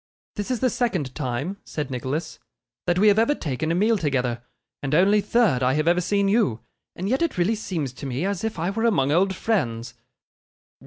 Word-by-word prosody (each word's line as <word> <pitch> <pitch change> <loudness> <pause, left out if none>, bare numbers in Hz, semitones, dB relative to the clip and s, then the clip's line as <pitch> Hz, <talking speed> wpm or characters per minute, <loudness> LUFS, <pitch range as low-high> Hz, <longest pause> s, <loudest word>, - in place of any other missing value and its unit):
'This 205 +2 -4
is 250 -3 0
the 255 - +3
second 185 - -1
time,' 140 +7 -3
said 145 -3 -5
Nicholas, 130 +6 -4 0.5
'that 175 0 +2
we 210 +3 +5
have 205 +1 +5
ever 230 +6 +3
taken 155 - -2
a - - +1
meal 215 +3 +2
together, 125 -6 -1 0.4
and 145 +1 -1
only 200 +5 +4
third 210 - +2
I 130 +1 +2
have 155 +2 0
ever 175 +1 +4
seen 200 +2 +1
you; 195 - +2 0.3
and 185 - -4
yet 260 +7 +1
it 335 - 0
really 180 +5 +2
seems 165 - -3
to 135 - -7
me 135 +6 -2
as 200 -1 -2
if 220 -4 -2
I 170 +4 -1
were 225 +3 -1
among 145 -12 +2
old 190 +4 +2
friends. 120 - -1
175 Hz, 205 wpm, -24 LUFS, 135-210 Hz, 0.5 s, we